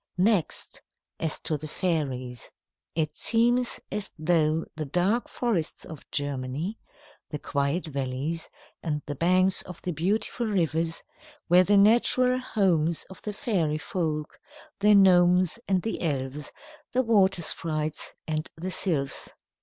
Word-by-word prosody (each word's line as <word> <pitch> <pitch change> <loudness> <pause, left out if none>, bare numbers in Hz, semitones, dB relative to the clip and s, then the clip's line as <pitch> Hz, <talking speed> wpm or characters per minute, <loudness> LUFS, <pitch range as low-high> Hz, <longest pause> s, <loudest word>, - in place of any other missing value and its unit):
Next, 190 -2 0 0.4
as 160 -2 -2
to 155 - -1
the 155 +2 -7
fairies. 135 -8 -2 0.5
It 155 -2 -1
seems 240 +2 +1
as 205 0 -4
though 155 -1 +2
the 155 -1 -3
dark 185 - 0
forests 205 -10 -2
of 160 -3 -11
Germany, 145 +7 -3 0.5
the 150 - -4
quiet 140 +5 -1
valleys, 140 +3 -3 0.3
and 150 -3 -2
the 145 - -4
banks 185 +5 +2
of 180 - -10
the 180 - -1
beautiful 200 +8 -1
rivers, 165 -4 0 0.5
were 180 +1 +7
the 200 +2 +4
natural 240 +4 +5
homes 170 -9 +1
of 190 - -11
the 210 - -4
fairy 190 - 0
folk, 155 -2 -3 0.4
the 210 +1 +6
gnomes 180 0 +5
and 190 -2 +1
the 225 - -3
elves, 145 -2 -2 0.4
the 255 +1 +3
water 195 -6 +3
sprites 155 -1 -2
and 155 -1 -2
the 180 +3 -4
sylphs. 150 -9 +1
170 Hz, 130 wpm, -27 LUFS, 150-195 Hz, 0.5 s, were